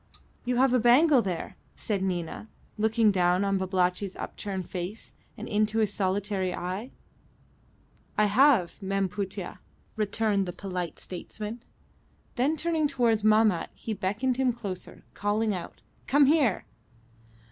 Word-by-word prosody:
"You 250 0 0
have 255 +1 +3
a 250 - +4
bangle 255 +4 +5
there," 180 -6 -4 0.2
said 205 -3 -2
Nina, 180 +2 -3 0.3
looking 220 0 +3
down 180 0 +2
on 195 -1 +1
Babalatchi's 185 +1 0
upturned 190 -3 -5
face 185 +4 -6 0.2
and - - -6
into 215 +1 +1
his 215 -2 +1
solitary 190 -1 -1
eye. 185 +7 -4 1.3
"I 210 - +4
have, 215 -4 +3
Mem 195 0 0
Putih," 195 -1 -5 0.4
returned 210 -2 0
the 175 - -4
polite 180 -4 -5
statesman. 210 +5 -7 0.7
Then 280 +6 +1
turning 320 -1 +1
towards 235 -6 +1
Mahmat 215 -5 +3
he 225 - -4
beckoned 210 +6 -1
him 260 -2 +2
closer, 200 -6 -7
calling 210 +1 0
out, 180 -3 -7 0.2
"Come 285 +2 +5
here!" 275 - +2
210 Hz, 130 wpm, -27 LUFS, 190-235 Hz, 1.3 s, bangle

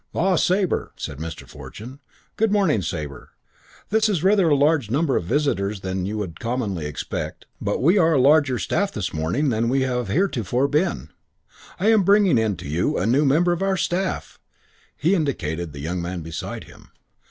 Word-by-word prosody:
"Ah, 190 +2 +2
Sabre," 185 +1 +1
said 70 - -6
Mr. 80 -1 -7
Fortune. 125 +6 -10 0.4
"Good 220 -1 +1
morning, 190 - +2
Sabre. 75 -6 -6 0.6
This 220 0 +3
is 180 -6 0
rather 195 -3 +4
a 145 - +4
larger 140 -5 +2
number 145 +1 +1
of - - 0
visitors 105 - 0
than 95 0 -3
you 105 +2 -3
would 95 -6 -5
commonly 110 -10 -2
expect, 75 - -5 0.2
but - - -1
we 180 +7 +5
are 165 -2 +4
a 140 - +3
larger 140 -1 +4
staff 200 +9 -1
this 100 -4 -4
morning 85 - 0
than 115 0 0
we 135 +2 +2
have 125 -2 -1
heretofore 130 - 0
been. 150 - -1 0.7
I 210 +5 +3
am 220 -2 +5
bringing 195 - +4
in 110 -3 0
to 90 - -8
you 80 +5 0
a 95 - 0
new 130 +7 +3
member 165 +6 +3
of 175 +1 -1
our 195 0 +1
staff." 185 +1 -2 0.6
He 165 +6 +2
indicated 85 - -2
the 70 - -9
young 85 +4 -3
man 85 0 -4
beside 80 0 -6
him. - - -17
130 Hz, 185 wpm, -23 LUFS, -, 0.7 s, we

